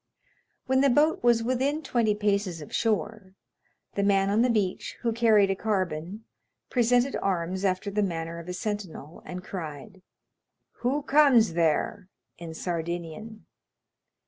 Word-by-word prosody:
When 265 0 +2
the 280 - +4
boat 295 +5 +3
was 235 -1 +4
within 265 +6 0
twenty 235 -5 +1
paces 200 -4 0
of 150 - -10
the - - -16
shore, 210 -2 -1 0.6
the 200 - -1
man 195 -1 +2
on 215 +3 +3
the 250 - +3
beach, 205 -5 -1
who 230 -2 0
carried 220 -4 +4
a - - 0
carbine, 185 -2 -2 0.5
presented 245 +2 +2
arms 185 0 -1
after 195 +1 0
the 210 +1 0
manner 170 -3 -3
of 170 +1 -9
a - - -3
sentinel, 185 -6 -5
and 180 0 -6
cried, 185 +3 -8 0.8
"Who 275 +4 -1
comes 270 - +5
there?" 170 +4 0 0.3
in 165 -2 -8
Sardinian. 175 +6 -5
200 Hz, 145 wpm, -27 LUFS, 180-230 Hz, 0.8 s, comes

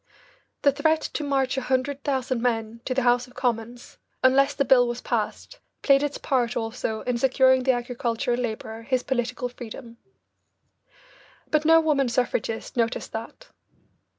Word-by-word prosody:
The 280 - +6
threat 315 +3 +2
to 305 - -2
march 270 -2 0
a - - 0
hundred 265 +2 -1
thousand 260 -3 -1
men 230 -1 -1
to 255 - -2
the 265 - +1
House 245 +1 +3
of 250 - -19
Commons 240 -1 -3 0.2
unless 275 +2 +4
the 280 - +1
bill 250 -2 +5
was 240 0 -3
passed - - -3 0.2
played 275 -1 +5
its 290 -1 -2
part 245 -4 0
also 225 -1 -3
in 245 -1 -2
securing 260 0 +4
the 260 +1 +3
agricultural 240 -1 -2
labourer 220 -1 -4
his 255 +2 -1
political 250 -1 -2
freedom. 240 -1 -10 1.5
But 305 0 +2
no 325 +1 +7
woman 290 -5 +1
suffragist 235 -2 -2
noticed 230 -1 -1
that. 230 - -8
250 Hz, 150 wpm, -25 LUFS, 235-270 Hz, 1.5 s, no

